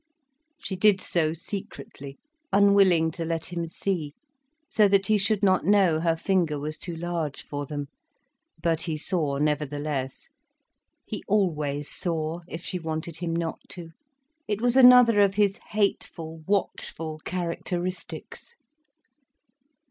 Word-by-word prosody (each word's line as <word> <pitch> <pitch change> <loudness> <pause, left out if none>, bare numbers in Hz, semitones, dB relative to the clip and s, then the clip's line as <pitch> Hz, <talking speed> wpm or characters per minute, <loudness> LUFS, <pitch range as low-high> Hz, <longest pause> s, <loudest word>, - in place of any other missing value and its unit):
She 190 - -5
did 195 +1 +4
so 160 -4 0
secretly, 165 -4 -8 0.3
unwilling 195 -5 +5
to 165 +1 -5
let 165 +1 -3
him 170 -1 -2
see, 165 -4 -3 0.5
so 210 -5 +4
that 195 0 +3
he 215 +2 +3
should 210 +1 0
not 185 -2 +4
know 185 -3 +4
her 165 0 +1
finger 165 -3 0
was 150 +2 -5
too 175 -2 -4
large 165 -3 -3
for 145 -1 -5
them. 145 0 -4 0.8
But 165 -2 +1
he 160 -3 -2
saw 150 -3 0
nevertheless. 145 -2 -2 0.7
He - - -5
always 150 -8 0
saw, 165 -1 -2
if 165 0 -7
she 180 - -2
wanted 160 0 -4
him 165 -1 -3
not 165 -1 -2
to. 170 -2 -6 0.6
It 210 -1 -1
was 245 +1 +2
another 250 -4 +8
of 200 -1 +3
his 205 -1 +2
hateful, 165 -6 -1
watchful 165 -5 -2
characteristics. 180 - -5
170 Hz, 130 wpm, -26 LUFS, 155-195 Hz, 0.8 s, another